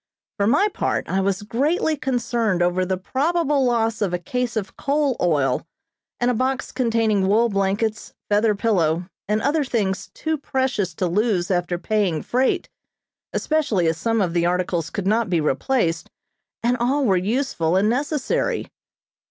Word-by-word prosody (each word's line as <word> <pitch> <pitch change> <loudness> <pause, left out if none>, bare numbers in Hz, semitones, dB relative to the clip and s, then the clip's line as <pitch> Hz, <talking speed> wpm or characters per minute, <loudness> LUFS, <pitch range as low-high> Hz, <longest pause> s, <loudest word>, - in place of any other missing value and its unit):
For 200 -1 +1
my 290 - +4
part, 410 - -2
I 195 - 0
was 195 +1 -1
greatly 295 - 0
concerned 235 -8 0
over 180 +1 +1
the 190 0 0
probable 290 - 0
loss 225 -2 +1
of 185 -4 +1
a - - 0
case 245 +7 -3
of 195 -3 -4
coal 285 -2 0
oil, 145 -5 +1 0.5
and 245 +1 +2
a - - 0
box 260 +3 -1
containing 225 -6 +1
wool 225 +4 +3
blankets, 205 +2 -1 0.2
feather 210 +1 +2
pillow, 175 -6 +1 0.2
and 210 +1 0
other 295 +2 +2
things 210 -7 -1
too 315 -1 -2
precious 260 - -1
to 185 - -1
lose 190 0 +1
after 175 -1 0
paying 190 -5 0
freight, 255 +2 +1 0.6
especially 290 - 0
as 160 0 +1
some 225 +1 +1
of 175 -3 0
the 170 -1 +1
articles 175 -2 -1
could 200 - -4
not 220 +1 +1
be 175 -2 +2
replaced, 165 - 0 0.5
and 245 +1 +2
all 265 +4 +1
were 195 -5 +3
useful 185 - 0
and 195 +3 +3
necessary. 280 +4 -1
215 Hz, 160 wpm, -22 LUFS, 185-255 Hz, 0.6 s, my